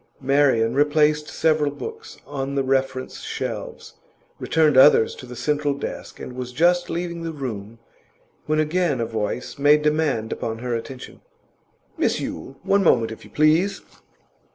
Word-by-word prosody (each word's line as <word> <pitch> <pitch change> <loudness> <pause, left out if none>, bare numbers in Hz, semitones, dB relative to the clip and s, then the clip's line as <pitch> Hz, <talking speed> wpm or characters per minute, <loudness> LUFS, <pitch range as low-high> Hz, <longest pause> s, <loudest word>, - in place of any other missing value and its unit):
Marian 130 -4 +2
replaced 150 +1 +2
several 155 -2 +1
books 450 - -8
on 135 0 -4
the 135 - +1
reference 130 -1 -1
shelves, - - -6 0.5
returned 155 -3 +2
others 130 -3 +6
to 125 - -11
the 125 - -9
central 145 +3 0
desk, 140 - -7
and 125 - -7
was 125 0 -6
just 175 +6 +2
leaving 170 0 -3
the 165 0 -4
room, 115 -7 -6 0.7
when 155 0 +1
again 155 -2 +1
a 115 - 0
voice 110 +4 -4
made 150 +1 +5
demand 150 -7 0
upon 115 0 -4
her 120 +1 -4
attention. 125 +2 -7 0.8
'Miss - - +1
Yule! 135 +12 -6
One 200 0 +3
moment, 115 -9 +3
if 110 - -9
you - - -14
please! 160 +6 +2
140 Hz, 150 wpm, -23 LUFS, 125-155 Hz, 0.8 s, others